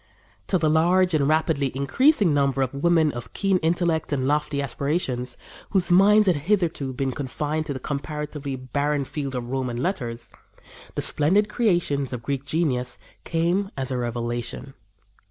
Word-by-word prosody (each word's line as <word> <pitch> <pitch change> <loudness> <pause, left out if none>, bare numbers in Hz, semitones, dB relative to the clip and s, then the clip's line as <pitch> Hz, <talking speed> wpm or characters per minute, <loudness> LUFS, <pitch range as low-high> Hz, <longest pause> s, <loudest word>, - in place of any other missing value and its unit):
To 190 - +2
the 160 -2 +1
large 175 +4 +3
and 145 -3 +2
rapidly 155 -3 +1
increasing 200 - +3
number 140 -1 +2
of 130 - -3
women 160 +1 +2
of 120 -2 -8
keen 195 -2 +1
intellect 165 -1 0
and 130 -2 0
lofty 150 0 0
aspirations, 140 -2 -1 0.3
whose 185 -3 +1
minds 205 +4 +6
had 180 -5 +3
hitherto 165 -4 0
been 130 +1 -2
confined 150 +4 -3
to 145 - -2
the 130 - -6
comparatively 150 0 -4
barren 140 +3 -1
field 140 -2 -5
of 120 0 -4
Roman 130 -3 -2
letters, 120 -6 -3 0.6
the - - -1
splendid 195 +8 +3
creations 175 - 0
of 120 -2 -5
Greek 140 +2 -3
genius 130 -6 -1 0.3
came 175 +4 0
as 135 -1 -2
a 130 - -1
revelation. 120 +2 -4
145 Hz, 155 wpm, -24 LUFS, 130-170 Hz, 0.6 s, minds